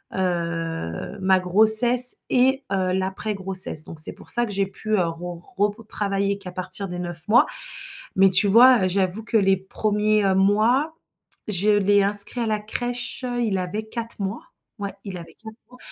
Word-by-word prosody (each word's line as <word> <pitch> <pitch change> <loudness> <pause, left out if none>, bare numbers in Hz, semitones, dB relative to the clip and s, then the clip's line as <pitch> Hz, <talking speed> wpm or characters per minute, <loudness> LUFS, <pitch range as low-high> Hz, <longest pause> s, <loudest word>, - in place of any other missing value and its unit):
heu, 165 - -4
ma 190 0 +2
grossesse 220 +7 +6
et 265 +2 +1
heu, 185 -2 -1
l'après-grossesse, 190 -3 -1
donc 165 - -8
c'est 155 - +1
pour - - -10
ça 240 0 +2
que 215 - -8
j'ai 195 0 -1
pu, 215 +2 -12
heu, 180 -3 0
re 170 +1 -7 0.2
retravailler 200 -1 -2
qu'à 190 -2 -10
partir 185 +2 -5
des 180 0 -6
9 175 -1 -3
mois, 240 +7 +4 0.7
mais 195 0 +4
tu 190 +3 +3
vois? 235 0 +5
Heu, - - +1
j'avoue 190 +3 -2
que 230 0 0
les 195 -2 +2
1ers, 210 +2 -1
heu, 190 -1 +1
mois, 220 +10 +1 0.6
je 205 +1 0
l'ai 205 -1 +2
inscrit 205 +4 +3
à 230 - -2
la 215 -1 -2
crèche, 245 +4 -5
heu, 245 -1 -3
il 205 -5 -1
avait 185 +4 -4
4 230 0 -7
mois, 195 +3 -4 0.4
ouais, 200 -1 -6
il 195 -3 -7
avait 170 - -13
4 220 -1 -13
mois, 250 - -18
200 Hz, 175 wpm, -22 LUFS, 185-220 Hz, 0.7 s, grossesse